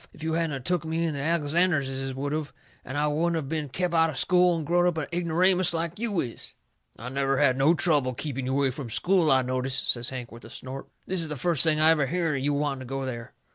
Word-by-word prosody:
If 155 - -12
you 160 0 -1
hadn't 165 -2 0
of 135 - -7
took 175 +2 0
me 160 +1 -1
in 160 - -1
the 140 - -4
Alexanderses 145 -4 0
would 140 +2 -3
of, 155 -2 -3 0.3
and 130 - -7
then 145 - +1
I - - +2
wouldn't 165 +3 0
of 150 -4 -4
been 155 -1 -3
kep' 175 +6 -2
out 165 -1 +4
of 150 - -5
school 180 +2 +3
and 160 - -4
growed 175 +3 +3
up 175 -2 0
a 160 +2 -4
ignoramus 175 +1 +2
like 170 +3 -3
you 220 -6 0
is." 120 -3 -6 0.4
"I 120 +3 -7
never 135 0 0
had 135 -3 +4
no 140 +6 +4
trouble 145 -7 +2
keeping 135 -2 -4
you 130 - -1
away 140 -2 +2
from 125 -2 -7
school, 175 - +2
I 130 -1 +4
notice," 130 +1 -1
says 120 -2 +2
Hank, 125 -2 -7
with 115 +1 -12
a - - -11
snort. 130 +1 -8 0.2
"This 185 -1 -1
is 165 - -4
the 150 -1 -4
first 165 +2 +2
I 155 0 +5
ever 150 -4 +2
hearn 165 -1 0
of 135 - -4
you 145 0 +1
wanting 140 -2 -1
to 130 - -8
go 135 +1 -4
there." 120 -3 -6
150 Hz, 260 wpm, -26 LUFS, 135-170 Hz, 0.4 s, I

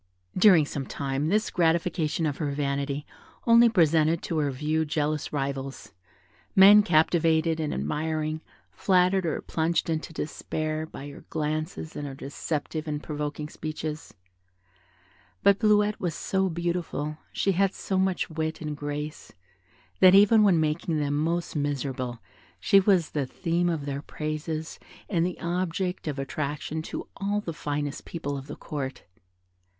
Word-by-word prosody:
During 185 -6 +6
some 140 -2 -5
time 140 +1 -2
this 210 +5 +1
gratification 165 -1 +1
of 145 -3 -1
her 150 -3 -1
vanity 140 0 -2 0.4
only 235 0 +7
presented 165 -4 +3
to 165 - -1
her 145 -2 +1
view 150 +4 0
jealous 150 -1 -1
rivals, 135 -3 -4 0.6
men 200 +2 +9
captivated 160 -2 +3
and 155 -2 -1
admiring, 155 - -2 0.3
flattered 185 -1 +2
or 155 - -1
plunged 165 +1 0
into 160 +1 -3
despair, 155 0 -3
by 145 - -9
her - - -12
glances 155 +1 -3
and 145 - -4
her 135 - -7
deceptive 150 +3 -4
and 150 -1 -3
provoking 150 0 -4
speeches; 155 0 -6 1.3
but 200 0 +5
Bleuette 210 -1 +3
was 175 -3 -2
so 190 0 0
beautiful, 170 -3 -3
she 195 - +1
had 195 +1 +2
so 190 -1 -2
much 190 -1 +1
wit 160 -1 -3
and 150 -2 -4
grace, 145 +1 -5 0.7
that, 185 0 +8
even 210 +2 +7
when 195 -5 +5
making 155 +1 0
them 145 -1 0
most 165 +3 -1
miserable, 135 -4 -2 0.4
she 195 - +5
was 185 -4 +3
the 145 -3 -1
theme 175 +3 0
of 160 -4 -2
their 140 0 -3
praises 155 +1 -4 0.3
and 170 -5 +1
the 180 0 -2
object 180 +1 -2
of 145 -2 -2
attraction 145 +3 -3
to - - -6
all 200 +1 0
the 175 -5 -5
finest 145 -1 -3
people 145 -4 -4
of 135 0 -7
the 145 - -6
Court. 135 -3 -5
155 Hz, 145 wpm, -27 LUFS, 145-175 Hz, 1.3 s, men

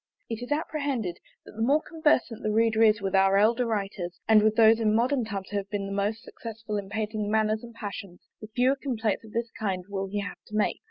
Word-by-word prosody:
It 225 +1 -3
is 245 - -7
apprehended, 280 - -2 0.3
that - - -12
the 220 - -7
more 275 +6 +4
conversant 295 -8 +1
the 215 - -1
reader 225 0 +2
is 215 -1 +5
with 195 -1 -2
our 195 0 +4
elder 230 +4 +3
writers, 195 -5 -3
and 220 -1 +7
with 215 0 +3
those 225 0 +6
in 215 -1 +2
modern 250 +2 +2
times 195 -3 -5
who 205 - -1
have 195 -1 -4
been 205 -2 -2
the 195 - -5
most 205 +3 -1
successful 225 -2 -7
in 195 -1 -8
painting 215 -1 -2
manners 215 0 +1
and 235 -1 -11
passions, 200 -4 -7 0.2
the 215 - -7
fewer 250 +4 +2
complaints 235 -7 -2
of 220 - -13
this 235 +1 -2
kind 190 -4 -3
will 195 -1 -3
he 205 +1 -2
have 200 - -7
to 210 - -8
make. 215 - +1
215 Hz, 230 wpm, -27 LUFS, 200-230 Hz, 0.3 s, and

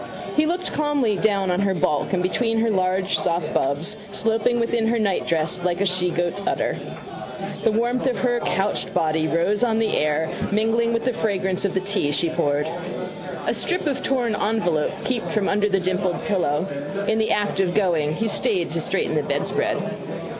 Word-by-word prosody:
He 305 0 +3
looked 355 +2 -2
calmly 290 -8 +1
down 195 -2 +1
on 180 - +1
her 195 -1 +1
bulk 150 -3 0
and 185 -2 +1
between 225 +5 +1
her 230 -1 +2
large 190 0 +1
soft 170 +1 0
bubs, 150 +10 0
sloping 225 +3 +1
within 230 -1 +1
her 235 +1 +2
nightdress 180 -5 0
like 175 0 0
a - - +2
shegoat's 180 0 0
udder. - - 0 0.9
The 225 - +4
warmth 240 +4 0
of 255 - 0
her 245 -1 +2
couched 195 -2 -1
body 160 0 +1
rose 180 +8 +1
on 225 -2 +2
the 225 -1 +1
air, 155 +1 +1 0.2
mingling 225 +2 +2
with 230 0 -1
the 255 - +1
fragrance 195 -3 0
of 195 - -1
the 190 - +1
tea 195 -6 0
she 165 +3 +2
poured. 145 0 0 0.8
A - - +1
strip 360 -2 0
of 285 -3 -1
torn 245 -5 0
envelope 205 -8 +1 0.2
peeped 250 -3 -1
from 215 -2 +1
under 210 +1 +2
the 195 -1 +2
dimpled 185 0 -1
pillow. 175 -8 +1 0.4
In 220 - +2
the 220 - +1
act 205 -1 0
of 180 -2 +1
going 165 -7 +2
he 225 - -1
stayed 180 -5 0
to 165 +1 -1
straighten 190 0 0
the 155 - +2
bedspread. 145 0 0
195 Hz, 180 wpm, -23 LUFS, 175-225 Hz, 0.9 s, The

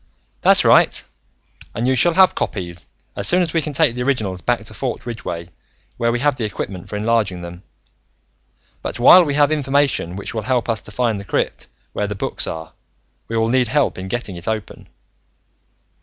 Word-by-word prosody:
"That's - - +5
right. - - +4 0.7
And 115 +4 -1
you 130 - +3
shall 165 +6 +3
have 190 -1 +6
copies, 85 -4 -4 0.3
as - - +2
soon 180 +1 +5
as 160 - -3
we 165 - +2
can 150 - -4
take 145 -3 +2
the 125 - -4
originals 110 -9 -1
back - - 0
to - - -9
Fort - - -4
Ridgeway, 90 -8 -6 0.5
where 115 0 +1
we 120 - 0
have 145 0 +2
the 125 - -4
equipment 100 -3 -5
for - - -5
enlarging 105 -4 0
them. 85 +1 -9 1.2
But - - -5
while 175 +9 +8
we 145 -4 -1
have 145 0 +4
information 140 - +1
which 100 +5 -6
will 110 - -2
help 125 +2 -1
us 115 -2 -1
to - - -12
find 115 -2 0
the - - -7
crypt 95 - -2 0.3
where 105 - -1
the 105 - -4
books 95 - -2
are, 80 -1 -6 0.5
we 115 - -3
will 115 0 +1
need 125 0 +2
help 135 -3 0
in 95 - -6
getting 115 -3 -4
it 85 - -9
open." 110 -2 -4
115 Hz, 195 wpm, -20 LUFS, 100-135 Hz, 1.2 s, while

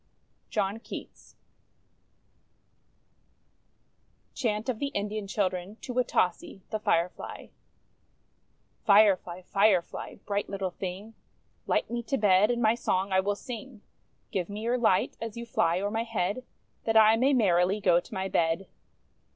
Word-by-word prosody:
JOHN 205 +1 -1
KEATS - - -10 3.0
CHANT 220 -3 -1
OF 245 -4 -2
THE 280 - -1
INDIAN 210 0 -2
CHILDREN 190 -1 -2
TO 250 - -7
WATASEE, 195 -6 0
THE 215 - -1
FIREFLY 175 -3 -2 1.3
Firefly! 200 -4 +4
Firefly! 195 -2 +1
Bright 200 0 -2
little 195 -2 -3
thing, 190 +5 -6 0.5
Light - - 0
me 240 0 -1
to 270 +4 -2
bed, 205 -1 +4
and 240 -1 0
my 220 0 +5
song 195 -4 -1
I 190 - +4
will 200 +2 0
sing. 240 -1 -8 0.5
Give 180 -2 -2
me 205 +1 -5
your 245 +2 +1
light, 220 -6 +2
as 230 -1 -5
you 235 - -5
fly 175 -6 +1
o'er 200 +1 -2
my 225 +1 0
head, 225 +1 -2 0.4
That 225 0 +3
I 220 0 +7
may 260 +5 +3
merrily 190 -3 +3
go 180 -3 +4
to - - -13
my 190 0 -1
bed. 165 +1 +1
205 Hz, 135 wpm, -28 LUFS, 185-225 Hz, 3.0 s, I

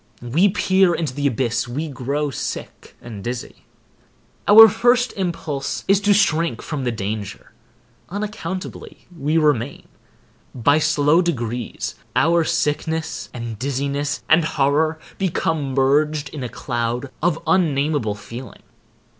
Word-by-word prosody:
We 150 +12 +2
peer 190 -2 +3
into 155 -6 -2
the 145 +1 0
abyss—we 125 +4 -1
grow 140 +2 -2
sick - - -6
and 110 -5 -8
dizzy. 120 0 -6 0.8
Our 225 +2 +11
first 240 +4 +2
impulse 165 -7 -3
is 195 +1 +4
to 205 0 +2
shrink 170 -5 +1
from 145 -4 -4
the 120 - +1
danger. 105 -1 -5 0.6
Unaccountably 200 -1 -6
we 150 +1 0
remain. 145 -5 0 0.7
By 145 +5 +3
slow 150 +1 +3
degrees 120 -8 -3 0.2
our 170 +1 +3
sickness 160 0 -2
and 115 -3 -6
dizziness 140 +2 -2
and 160 +1 +5
horror 155 +2 +1 0.2
become 160 -7 -1
merged 145 +2 +2
in 150 - -7
a 125 - -4
cloud 120 +2 -3
of 170 -1 +2
unnamable 145 - +1
feeling. 115 +1 -10
145 Hz, 120 wpm, -21 LUFS, 125-165 Hz, 0.8 s, Our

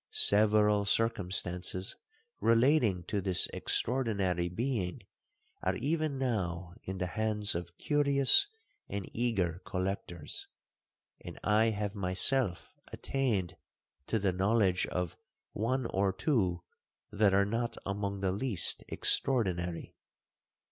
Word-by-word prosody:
Several 105 0 +4
circumstances 95 -3 0 0.4
relating 115 - +3
to 100 +3 -2
this 95 -2 +1
extraordinary 100 -8 0
being 110 0 -2 0.6
are - - 0
even 155 -1 -1
now 95 -9 -2
in 95 0 -6
the 90 - -1
hands 105 +1 -1
of 85 0 -6
curious 145 - +4 0.4
and 100 -2 -4
eager 100 -8 0
collectors; 90 -4 -4 0.8
and - - -8
I 105 +2 +3
have 105 -2 -1
myself 95 +2 +2 0.2
attained 115 -10 -1 0.5
to 115 - +1
the 100 -3 0
knowledge 95 -1 +2
of 90 -3 -3 0.3
one 130 +4 -1
or 95 -2 +1
two 95 - 0 0.5
that 105 -2 +3
are 100 0 +4
not 115 +3 -2
among 100 0 -3
the 95 -1 +1
least 100 -1 0
extraordinary. 90 -9 0
100 Hz, 105 wpm, -31 LUFS, 90-115 Hz, 0.8 s, Several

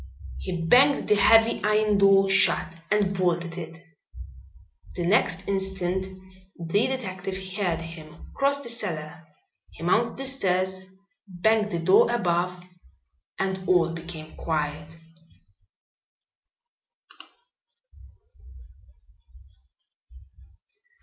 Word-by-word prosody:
He 170 - -4
banged 270 +9 +4
the 210 - +5
heavy 225 +3 +4
iron 210 -1 +2
door 195 0 +5
shut 195 -3 +3 0.2
and 205 -2 +1
bolted 175 -2 -1
it. 165 0 -9 1.1
The 175 - -3
next 190 -1 +1
instant 190 -1 -2 0.5
the 175 +6 0
detective 195 -7 -5 0.2
heard 180 -5 -2
him 165 -1 -12
cross 280 +1 0
the 240 - -7
cellar. 165 -8 -6 0.4
He - - -12
mounted 225 +7 +1
the 270 - -5
stairs, 190 -7 -1 0.5
banged 210 +4 +1
the 175 - -3
door 185 +7 +4
above; 180 -5 -1 0.7
and 190 -1 -2
all 170 -2 +3
became 165 -2 -9
quiet. 150 0 -4
185 Hz, 90 wpm, -25 LUFS, 170-210 Hz, 1.1 s, the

